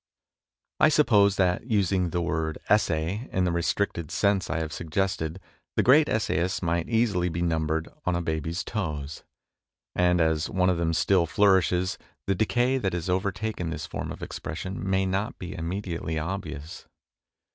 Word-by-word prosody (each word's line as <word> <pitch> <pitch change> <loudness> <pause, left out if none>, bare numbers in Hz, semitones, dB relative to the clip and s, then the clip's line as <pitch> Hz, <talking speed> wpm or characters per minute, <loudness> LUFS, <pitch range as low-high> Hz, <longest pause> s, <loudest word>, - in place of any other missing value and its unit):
I 155 - +6
suppose 105 -10 +4
that, 90 +4 +1
using 95 -5 +1
the 85 +1 -1
word 80 -2 -1
" - - -20
essay 90 - -1
" - - -23
in 95 - +1
the 90 - +1
restricted 85 -1 -1
sense 100 -2 +1
I - - -1
have 80 -1 -3
suggested, 85 0 -2 0.4
the - - +3
great 145 +4 +6
essayists 95 -4 0
might 85 0 0
easily 110 -7 +2
be 85 +1 -2
numbered 80 -1 0 0.2
on 90 - 0
a 85 - 0
baby's 80 +2 -2
toes, 75 -9 -4 0.7
and, 90 -1 +3
as 80 -1 +1
one 95 0 +2
of 90 - 0
them 85 -1 0
still 90 0 +3
flourishes, 95 -2 +2 0.3
the 100 - +2
decay 120 +6 +1
that 95 -6 -1
has 85 +1 -2
overtaken 95 -1 -1
this 80 - -4
form - - -5
of - - -8
expression 90 +5 -5
may 95 0 +2
not 95 +4 -2
be 90 - -6
immediately 85 -2 -3
obvious. 80 -2 -5
90 Hz, 165 wpm, -26 LUFS, 80-100 Hz, 0.7 s, I